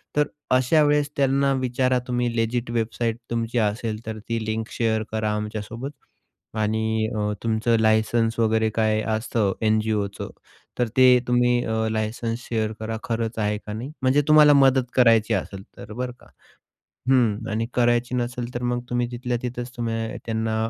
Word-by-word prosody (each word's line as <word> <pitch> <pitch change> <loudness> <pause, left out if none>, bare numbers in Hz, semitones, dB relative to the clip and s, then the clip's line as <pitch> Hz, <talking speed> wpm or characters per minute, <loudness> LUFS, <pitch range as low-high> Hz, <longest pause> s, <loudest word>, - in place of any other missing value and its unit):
तर 150 - +4 0.3
अशा 130 +5 +4
वेळेस 145 0 +2
त्यांना 140 0 +2
विचारा 125 0 +1
तुम्ही 120 -1 -1
लेजिट 115 +1 -1
वेबसाईट 115 0 -1
तुमची 115 0 -2
असेल 110 0 -1
तर 110 0 -5
ती 115 -1 -1
लिंक 110 +1 -3
शेअर 110 -2 0
करा 110 -1 -1
आमच्यासोबत. 105 +5 -5 0.6
आणि 110 0 0
अ, - - -2 0.2
तुमचं 115 +1 +1
लायसन्स 110 +1 +2
वगैरे 110 -1 +2
काय 110 -1 +2
असतं, 110 -2 0
एन-जी-ओचं. 110 -2 0 0.5
तर 120 - +2
ते 130 - +7 0.2
तुम्ही 125 0 +2
अ, 110 0 0
लायसन्स 115 +1 -2
शेअर 110 -2 -1
करा. 110 0 -4
खरंच 115 -1 -2
आहे 105 0 0
का 105 0 -8
नाही? 120 +7 -6
म्हणजे 130 +3 +3
तुम्हाला 150 -1 +7
मदत 135 -3 +4
करायची 115 -3 +4
असेल 95 -1 -3
तर 105 - -9
बरं 125 +2 -3
का. - - -19 0.8
हं, 120 -6 +2
आणि 110 +2 -1
करायची 120 0 +2
नसेल 125 0 -3
तर 120 - -4
मग 120 - 0
तुम्ही 120 0 0
तिथल्या 120 0 -2
तिथेच 125 0 -4
तुम्ही 115 -1 -3
त्यांना 110 -1 -1
115 Hz, 155 wpm, -24 LUFS, 110-125 Hz, 0.8 s, ते